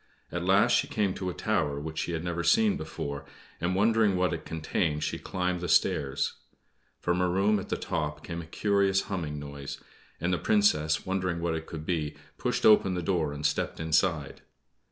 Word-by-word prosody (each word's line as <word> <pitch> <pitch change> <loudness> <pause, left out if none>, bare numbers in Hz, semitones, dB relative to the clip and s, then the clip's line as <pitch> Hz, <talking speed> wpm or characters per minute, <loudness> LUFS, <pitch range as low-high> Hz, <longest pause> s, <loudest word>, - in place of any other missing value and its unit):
At 85 +1 -3
last 95 +3 +4
she - - +3
came 100 -3 0
to 95 -1 -3
a - - -4
tower 70 -1 0
which 80 +1 -5
she 85 - -2
had 80 0 -2
never 85 -1 -2
seen 215 - +4
before, 70 - -5 0.4
and, 90 +2 0
wondering 110 0 +3
what 90 -1 +1
it 85 - -5
contained, 80 -1 -1
she - - -2
climbed 90 -1 -2
the 90 - -4
stairs. 70 0 +2 0.7
From 90 +1 0
a 90 - +2
room 100 +3 +2
at 95 - -8
the - - 0
top 75 -1 -3
came 85 -1 -4
a 80 - -11
curious 100 +1 +2
humming 80 -7 -4
noise, 70 -1 -7 0.4
and 85 +2 0
the 90 - 0
Princess, 80 -7 +2
wondering 95 -2 -1
what 85 -1 -1
it 80 0 -4
could 80 -1 -7
be, 80 -4 -2 0.2
pushed - - 0
open 100 -3 +6
the 90 - -2
door 80 -4 0
and 75 +1 -5
stepped - - 0
inside. 80 -2 +1
85 Hz, 195 wpm, -28 LUFS, 75-95 Hz, 0.7 s, open